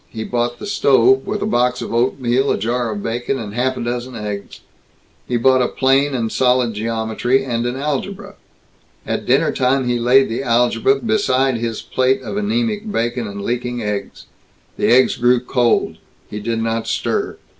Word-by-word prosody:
He 110 -1 -6
bought 120 +1 -2
the - - -8
stove, 135 - +3
with 210 - -2
a - - 0
box 125 - +1
of - - -5
oatmeal, 125 +2 +1
a - - +1
jar 120 +2 -1
of 105 -1 -5
bacon, 120 +4 -2
and 105 -4 -6
half 130 +2 0
a - - -4
dozen 120 +1 -4
eggs. 105 -2 -6 0.7
He 120 - 0
bought 130 +2 +4
a 125 - +2
plane 135 +1 +2
and 115 -3 -2
solid 125 -2 +2
geometry, 115 +4 -1
and 120 -2 -1
an 120 - -3
algebra. 150 +7 -4 0.7
At - - -3
dinner - - +3
time 130 0 +1
he 120 0 0
laid 130 +3 +4
the 115 +3 -3
algebra 125 - +2
beside 135 - +1
his 115 -1 -4
plate 130 +1 0
of - - -5
anemic 215 0 -1
bacon 120 - -1
and 100 0 -7
leaking 120 +1 -3
eggs. 105 -1 -4 0.5
The - - 0
eggs 130 +2 +4
grew 120 +1 +3
cold. 125 -1 0 0.3
He 105 - -4
did 115 +1 -2
not 115 0 -2
stir. - - -2
125 Hz, 175 wpm, -19 LUFS, 115-135 Hz, 0.7 s, bought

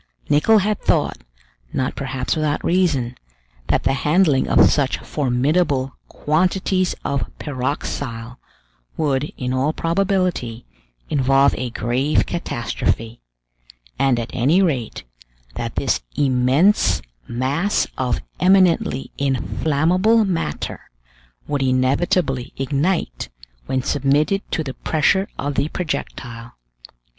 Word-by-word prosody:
Nicholl 150 +10 +5
had 210 0 0
thought, - - +1 0.5
not 130 - -1
perhaps 130 0 -2
without 155 -1 -1
reason, 155 -10 +1 0.5
that - - +1
the - - +2
handling 150 0 +2
of - - +6
such 140 -3 +1
formidable 135 0 0
quantities 185 +3 0
of 140 -2 -1
pyroxyle 130 -3 -4 0.6
would, 145 -2 0
in 125 0 -2
all 135 +4 +1
probability, 175 - -1 0.5
involve 135 0 +4
a 125 - -3
grave 125 +6 0
catastrophe; 120 -6 -3 0.8
and 135 -3 +3
at 115 - -5
any 140 +9 +3
rate, 140 - -1 0.5
that - - -5
this - - 0
immense 130 - +3 0.2
mass 140 +11 0
of 125 -3 -1 0.2
eminently 180 -7 +3
inflammable 160 - +2
matter 165 - -3 0.6
would 145 -2 -1
inevitably 130 +1 +1
ignite 140 - -1 0.4
when 130 -1 -1
submitted 145 +7 +1
to 160 - -1
the 135 -3 -5
pressure 190 +8 +1
of 145 0 -2
the 140 - 0
projectile. 120 -9 -5
140 Hz, 105 wpm, -21 LUFS, 130-170 Hz, 0.8 s, of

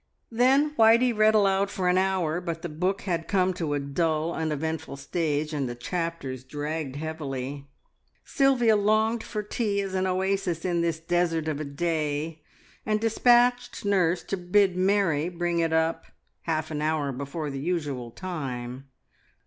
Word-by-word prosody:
Then 265 +6 +3
Whitey 230 +2 +5
read 215 0 +4
aloud 195 -1 +3
for 190 -2 -2
an 180 +1 +4
hour, 180 -3 0
but 170 -2 -5
the 175 - -3
book 185 +6 -1
had 170 -3 -2
come 185 -2 +2
to 160 -5 -2
a - - 0
dull, 155 +3 -1
uneventful 160 -2 -3
stage, 150 +1 -2
and 140 -4 -1
the 120 - -5
chapters 140 -2 -4
dragged 145 +1 -4
heavily. 140 -3 -5 0.6
Sylvia 260 -6 +3
longed 215 +2 +2
for 210 -2 -4
tea 210 -1 -1
as 195 -1 -3
an 190 0 0
oasis 185 -2 -1
in 175 -2 +1
this 165 -2 -1
desert 165 -1 0
of 150 -2 -2
a 155 - -3
day, 155 +1 -2 0.4
and 215 0 0
despatched 245 +2 +3
nurse 185 -4 +2
to 195 - -3
bid 185 +1 +2
Mary 185 -4 +2
bring 175 -1 -1
it 165 -1 +1
up 160 0 +1 0.4
half 160 -1 -1
an 150 -1 -3
hour 155 -2 0
before 140 +3 -4
the 135 - -5
usual 145 -6 -2
time. 130 -5 -6
170 Hz, 155 wpm, -26 LUFS, 150-195 Hz, 0.6 s, Whitey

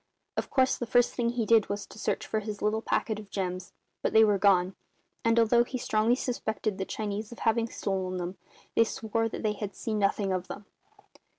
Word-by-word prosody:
Of - - -2
course 260 -1 +2
the 240 - -3
first 245 +1 +3
thing 235 -2 0
he 235 -1 -1
did 225 -3 +4
was 205 0 -3
to - - -13
search - - -1
for 220 - -1
his 210 -1 -6
little 215 +1 +1
packet 220 -1 -1
of 210 -2 -11
gems; 185 -2 -3 0.3
but - - -1
they 220 - +8
were 205 -2 +3
gone; 190 -2 +4 0.5
and, 230 0 +3
although 235 +1 +5
he 255 +1 -5
strongly 220 0 +2
suspected 220 -5 -2
the 190 - -1
Chinese 210 +1 -4
of 235 - -9
having 230 +1 +1
stolen 190 -3 -2
them, 180 +1 -4 0.4
they 230 - +6
swore 225 0 -1
that - - -6
they 215 -1 +1
had 205 -1 -6
seen 220 -3 -2
nothing 195 -1 +1
of 185 -1 -2
them. 205 - -8
215 Hz, 210 wpm, -29 LUFS, 200-230 Hz, 0.5 s, they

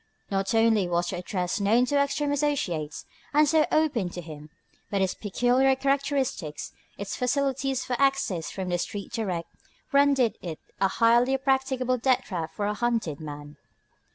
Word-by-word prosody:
Not 195 +3 0
only 225 -4 +3
was 175 0 0
the 180 - -4
address 180 +2 -2
known 220 +5 +3
to 285 - -1
Ekstrom's 285 0 0
associates, 175 - -2 0.3
and 300 0 +6
so 310 +1 +3
open 280 - +1
to 175 - -7
him, 155 -2 -10 0.4
but 200 - 0
its 190 -1 +1
peculiar 245 +6 +2
characteristics, 275 - -1 0.3
its 200 -1 -4
facilities 270 0 0
for 250 - -1
access 270 - +1
from 190 -2 -5
the 175 0 0
street 200 +2 -5
direct, 185 -7 -3 0.4
rendered 280 -4 +3
it 165 -4 -5 0.2
a 195 - +4
highly 235 +5 +3
practicable 265 -1 0
death 255 +1 +2
trap 165 -7 -4
for 205 - -2
a 210 - 0
hunted 225 -10 -1
man. 145 -1 -8
230 Hz, 155 wpm, -26 LUFS, 180-270 Hz, 0.4 s, and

